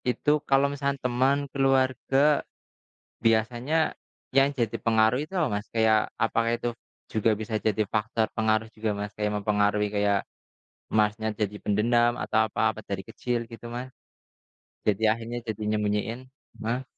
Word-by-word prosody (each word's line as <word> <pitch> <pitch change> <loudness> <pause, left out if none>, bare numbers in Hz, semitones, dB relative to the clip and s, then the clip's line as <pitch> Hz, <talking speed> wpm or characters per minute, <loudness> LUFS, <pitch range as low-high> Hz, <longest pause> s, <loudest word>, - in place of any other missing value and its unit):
Itu 125 +4 +1 0.2
kalau 135 0 +5
misalkan 140 0 -1
teman, 130 +2 +2 0.2
keluarga, 135 +1 +3 0.9
biasanya 120 +6 +2 0.6
yang 135 +1 +5
jadi 120 -3 0
pengaruh 110 +2 +3
itu 155 - -18
apa, 165 -5 +2
Mas? 105 - -16
Kayak, 110 -1 +3
apakah 115 0 +1
itu 120 +1 -3 0.4
juga 110 +1 +2
bisa 110 +1 -4
jadi 110 0 +1
faktor 110 +2 0
pengaruh 110 0 +1
juga, 110 0 -2
Mas? 105 0 -4
Kayak 105 0 -2
mempengaruhi 105 0 +2
kayak 100 -1 +2 0.7
Mas 105 -1 +3
nya 110 0 -2
jadi 105 -1 -2
pendendam 120 +3 +2
atau 110 - +1
apa 110 0 +1
pas - - -10
dari 95 -1 -2
kecil, 120 -1 -2
gitu 115 0 -11
Mas. 125 +2 -5 1.0
Jadi 105 0 +1
akhirnya 115 +2 -1
jadi 110 -2 -5
nyembunyiin 105 +3 -1 0.4
ma 120 +4 -1
115 Hz, 145 wpm, -27 LUFS, 105-125 Hz, 1.0 s, kalau